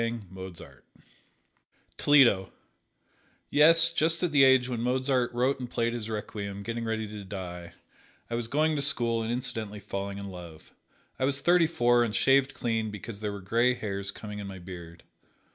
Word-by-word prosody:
Toledo: 125 Hz, -10 st, +5 dB, 1.0 s
Yes, 165 Hz, +3 st, +6 dB
just 165 Hz, +2 st, +1 dB
at 175 Hz, -, +1 dB
the 145 Hz, -2 st, +5 dB
age 130 Hz, -1 st, +5 dB
when 120 Hz, -2 st, -3 dB
Mozart 130 Hz, 0 st, 0 dB
wrote 125 Hz, +3 st, 0 dB
and 125 Hz, -2 st, -6 dB
played 115 Hz, 0 st, -1 dB
his 115 Hz, -2 st, -5 dB
"Requiem," 100 Hz, -2 st, -5 dB
getting 115 Hz, +1 st, -4 dB
ready 110 Hz, -1 st, -2 dB
to 105 Hz, -1 st, -8 dB
die, 90 Hz, -3 st, -7 dB, 0.5 s
I -, -, -7 dB
was 115 Hz, -1 st, -2 dB
going 155 Hz, +4 st, +1 dB
to 145 Hz, -, -1 dB
school 120 Hz, -5 st, +2 dB
and 110 Hz, +1 st, -2 dB
incidentally 115 Hz, -4 st, -3 dB
falling 100 Hz, -1 st, -5 dB
in 100 Hz, 0 st, -6 dB
love. 85 Hz, -3 st, -12 dB, 0.5 s
I 130 Hz, -, +2 dB
was 140 Hz, +1 st, +2 dB
thirty 175 Hz, +1 st, +4 dB
four 120 Hz, -6 st, +3 dB
and 115 Hz, -2 st, -2 dB
shaved 135 Hz, 0 st, +3 dB
clean 115 Hz, -2 st, -1 dB
because 105 Hz, +1 st, -8 dB
there 105 Hz, -1 st, -3 dB
were 100 Hz, -1 st, -7 dB
gray 115 Hz, +6 st, +2 dB
hairs 100 Hz, -3 st, -4 dB
coming 105 Hz, +1 st, -7 dB
in 100 Hz, -, -6 dB
my 95 Hz, -1 st, -8 dB
beard. 85 Hz, -2 st, -10 dB
115 Hz, 165 wpm, -28 LUFS, 100-130 Hz, 1.0 s, Yes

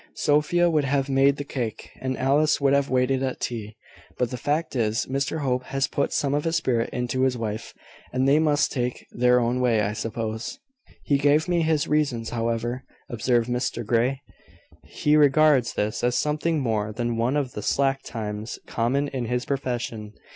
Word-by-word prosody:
Sophia 150 Hz, +4 st, +2 dB
would 155 Hz, -3 st, +2 dB
have 135 Hz, 0 st, 0 dB
made 135 Hz, +1 st, +4 dB
the 145 Hz, -, -3 dB
cake, 125 Hz, -6 st, -5 dB
and 130 Hz, 0 st, -2 dB
Alice 145 Hz, +4 st, +2 dB
would 140 Hz, -1 st, +3 dB
have 140 Hz, 0 st, +2 dB
waited 130 Hz, +1 st, +1 dB
at 130 Hz, -1 st, -2 dB
tea. 110 Hz, -3 st, -4 dB, 0.4 s
But 125 Hz, -2 st, 0 dB
the -, -, -3 dB
fact 150 Hz, +4 st, -1 dB
is, 110 Hz, -2 st, 0 dB
Mr 140 Hz, +4 st, -2 dB
Hope 125 Hz, -2 st, 0 dB
has 135 Hz, 0 st, 0 dB
put 140 Hz, -, -1 dB
some 140 Hz, -1 st, 0 dB
of 145 Hz, 0 st, 0 dB
his 165 Hz, 0 st, 0 dB
spirit 125 Hz, -8 st, 0 dB
into 125 Hz, +1 st, -2 dB
his 130 Hz, -1 st, +2 dB
wife, 110 Hz, -1 st, -5 dB, 0.4 s
and 130 Hz, +1 st, +1 dB
they 145 Hz, +3 st, +5 dB
must 150 Hz, -2 st, +2 dB
take 125 Hz, -2 st, -3 dB
their 125 Hz, 0 st, +3 dB
own 120 Hz, +1 st, 0 dB
way, 115 Hz, -4 st, +3 dB
I 105 Hz, 0 st, -1 dB
suppose." 110 Hz, -, -4 dB, 0.5 s
"He 140 Hz, -1 st, +2 dB
gave 145 Hz, +3 st, +3 dB
me 175 Hz, -1 st, +2 dB
his 160 Hz, -2 st, +1 dB
reasons, 140 Hz, -7 st, 0 dB
however," 115 Hz, +2 st, -2 dB, 0.3 s
observed 120 Hz, 0 st, +1 dB
Mr 125 Hz, -1 st, -2 dB
Grey. 125 Hz, +5 st, +1 dB, 0.6 s
"He 150 Hz, 0 st, +1 dB
regards 145 Hz, -3 st, +4 dB
this 105 Hz, +2 st, -2 dB
as 120 Hz, 0 st, +2 dB
something 155 Hz, +2 st, 0 dB
more 110 Hz, -4 st, -1 dB
than 120 Hz, +2 st, -2 dB
one 120 Hz, +5 st, +1 dB
of 135 Hz, -4 st, -1 dB
the 105 Hz, -, -6 dB
slack 135 Hz, +4 st, +1 dB
times 105 Hz, -1 st, -5 dB
common 130 Hz, +5 st, 0 dB
in 130 Hz, -3 st, -3 dB
his 125 Hz, +2 st, -2 dB
profession. 120 Hz, -6 st, -3 dB
130 Hz, 185 wpm, -25 LUFS, 115-145 Hz, 0.6 s, they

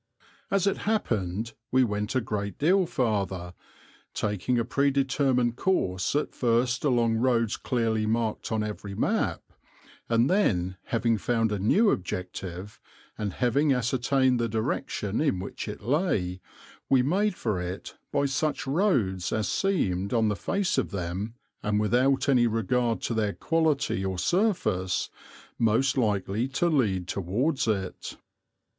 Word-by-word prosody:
As 195 Hz, -1 st, +2 dB
it 200 Hz, -, +1 dB
happened 110 Hz, -, -1 dB, 0.2 s
we 130 Hz, 0 st, +4 dB
went 105 Hz, 0 st, -2 dB
a 130 Hz, -, +3 dB
great 100 Hz, -3 st, -3 dB
deal 180 Hz, +4 st, +3 dB
farther, 100 Hz, -, -1 dB, 0.6 s
taking 105 Hz, +4 st, 0 dB
a 115 Hz, -, +1 dB
predetermined 135 Hz, -3 st, +1 dB
course 95 Hz, -, 0 dB
at 150 Hz, -, 0 dB
first 120 Hz, +1 st, +1 dB
along 120 Hz, -5 st, +2 dB
roads 115 Hz, -2 st, +2 dB
clearly 115 Hz, -3 st, 0 dB
marked 115 Hz, 0 st, -1 dB
on 110 Hz, -1 st, 0 dB
every 105 Hz, -2 st, -5 dB
map, -, -, 0 dB, 0.7 s
and 115 Hz, +1 st, +3 dB
then, 95 Hz, -, +1 dB
having 115 Hz, -1 st, +1 dB
found 115 Hz, -1 st, +1 dB
a 105 Hz, -, -1 dB
new 200 Hz, -, +4 dB
objective, 90 Hz, +1 st, -5 dB, 0.4 s
and 105 Hz, -3 st, -3 dB
having 135 Hz, +4 st, +2 dB
ascertained 130 Hz, +1 st, +1 dB
the 115 Hz, -1 st, 0 dB
direction 110 Hz, -1 st, -2 dB
in 145 Hz, -11 st, +1 dB
which 95 Hz, +4 st, -6 dB
it 105 Hz, 0 st, -7 dB
lay, 110 Hz, -, 0 dB, 0.5 s
we 130 Hz, -2 st, +4 dB
made 195 Hz, +8 st, +1 dB
for 105 Hz, -, -2 dB
it 90 Hz, +2 st, -6 dB, 0.2 s
by 140 Hz, -1 st, +1 dB
such 145 Hz, +3 st, -1 dB
roads 135 Hz, -, +1 dB
as 110 Hz, -1 st, 0 dB
seemed, 100 Hz, -, 0 dB
on 110 Hz, -2 st, +3 dB
the 105 Hz, -, 0 dB
face 195 Hz, -, 0 dB
of -, -, -2 dB
them, 100 Hz, +4 st, -4 dB, 0.3 s
and 105 Hz, 0 st, 0 dB
without 125 Hz, +6 st, +2 dB
any 125 Hz, -4 st, +4 dB
regard 115 Hz, +1 st, 0 dB
to -, -, -2 dB
their 105 Hz, -3 st, 0 dB
quality 155 Hz, -, 0 dB
or 95 Hz, -1 st, -2 dB
surface, 170 Hz, -, 0 dB, 0.5 s
most 115 Hz, +4 st, +2 dB
likely 105 Hz, -1 st, 0 dB
to 155 Hz, +6 st, 0 dB
lead 100 Hz, -, +1 dB
towards 115 Hz, -, -1 dB
it. 95 Hz, -4 st, -3 dB
115 Hz, 140 wpm, -27 LUFS, 100-135 Hz, 0.7 s, we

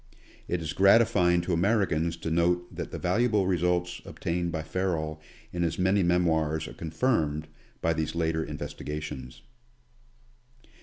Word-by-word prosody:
It 85 Hz, -1 st, -1 dB
is 80 Hz, -, -3 dB
gratifying 95 Hz, -4 st, +5 dB
to 90 Hz, +1 st, -2 dB
Americans 85 Hz, -3 st, +1 dB
to 80 Hz, -, -4 dB
note 90 Hz, +1 st, +1 dB
that -, -, -4 dB
the -, -, -6 dB
valuable 105 Hz, +2 st, +2 dB
results 90 Hz, -1 st, 0 dB
obtained, 85 Hz, +1 st, -3 dB
by 80 Hz, -2 st, -3 dB
Ferrel 80 Hz, -2 st, -2 dB, 0.3 s
in 85 Hz, -, -2 dB
his 85 Hz, -2 st, 0 dB
many 95 Hz, +2 st, +3 dB
memoirs 80 Hz, -3 st, +1 dB
are -, -, -9 dB
confirmed 80 Hz, -, 0 dB, 0.3 s
by 85 Hz, -, +2 dB
these 80 Hz, 0 st, -2 dB
later 80 Hz, -1 st, 0 dB
investi -, -, -6 dB
gations. 65 Hz, -5 st, -6 dB
85 Hz, 140 wpm, -28 LUFS, 80-90 Hz, 0.3 s, gratifying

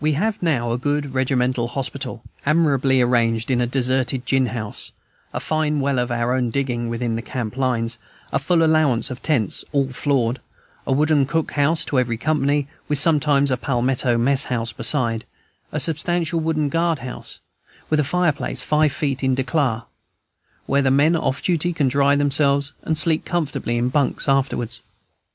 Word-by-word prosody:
We 155 Hz, 0 st, +2 dB
have 205 Hz, +8 st, -1 dB
now 130 Hz, -9 st, 0 dB
a 120 Hz, -, -1 dB
good 145 Hz, 0 st, -2 dB
regimental 130 Hz, -2 st, 0 dB
hospital, 130 Hz, -1 st, -5 dB, 0.2 s
admirably 140 Hz, -4 st, +2 dB
arranged 115 Hz, -1 st, +1 dB
in 125 Hz, -1 st, +2 dB
a 120 Hz, -, +1 dB
deserted 130 Hz, 0 st, 0 dB
gin 130 Hz, 0 st, +2 dB
house, 110 Hz, -2 st, -3 dB, 0.4 s
a -, -, -3 dB
fine 155 Hz, -1 st, 0 dB
well 140 Hz, -2 st, 0 dB
of 125 Hz, 0 st, -1 dB
our 120 Hz, +1 st, 0 dB
own 125 Hz, -2 st, 0 dB
digging, 120 Hz, -2 st, -2 dB
within 115 Hz, 0 st, -2 dB
the 115 Hz, -, -3 dB
camp 120 Hz, -2 st, -5 dB
lines, 120 Hz, -3 st, 0 dB, 0.3 s
a -, -, +2 dB
full 165 Hz, +4 st, +2 dB
allowance 150 Hz, -5 st, +2 dB
of 125 Hz, -, -7 dB
tents, 125 Hz, -, +1 dB
all 140 Hz, -2 st, +1 dB
floored, 130 Hz, -2 st, 0 dB, 0.5 s
a -, -, 0 dB
wooden 145 Hz, 0 st, +3 dB
cook 160 Hz, +1 st, -1 dB
house 150 Hz, +3 st, +2 dB
to 135 Hz, -, +1 dB
every 120 Hz, -2 st, -1 dB
company, 145 Hz, 0 st, 0 dB, 0.2 s
with 150 Hz, -, +1 dB
sometimes 145 Hz, -2 st, +3 dB
a 130 Hz, -, +1 dB
palmetto 125 Hz, -1 st, 0 dB
mess 135 Hz, +4 st, +3 dB
house 115 Hz, -2 st, -3 dB
beside, 115 Hz, -3 st, -1 dB, 0.5 s
a -, -, -2 dB
substantial 165 Hz, 0 st, +1 dB
wooden 155 Hz, -2 st, 0 dB
guard 165 Hz, +1 st, +1 dB
house, 125 Hz, -, -7 dB, 0.5 s
with 155 Hz, -, +3 dB
a -, -, +3 dB
fireplace 150 Hz, -5 st, 0 dB
five 150 Hz, +1 st, +2 dB
feet 140 Hz, -1 st, -2 dB
"in 130 Hz, -1 st, +2 dB
de 130 Hz, -, 0 dB
clar," 125 Hz, -5 st, 0 dB, 0.8 s
where 140 Hz, +1 st, +2 dB
the 135 Hz, -, +2 dB
men 145 Hz, +5 st, +4 dB
off 140 Hz, -4 st, -1 dB
duty 175 Hz, 0 st, +1 dB
can 150 Hz, -4 st, +1 dB
dry 140 Hz, +2 st, +3 dB
themselves 140 Hz, 0 st, +2 dB
and 160 Hz, -, -1 dB
sleep 155 Hz, 0 st, +3 dB
comfortably 145 Hz, -8 st, -2 dB
in 120 Hz, +1 st, +1 dB
bunks 140 Hz, +1 st, 0 dB
afterwards. 135 Hz, -4 st, 0 dB
135 Hz, 175 wpm, -21 LUFS, 125-150 Hz, 0.8 s, men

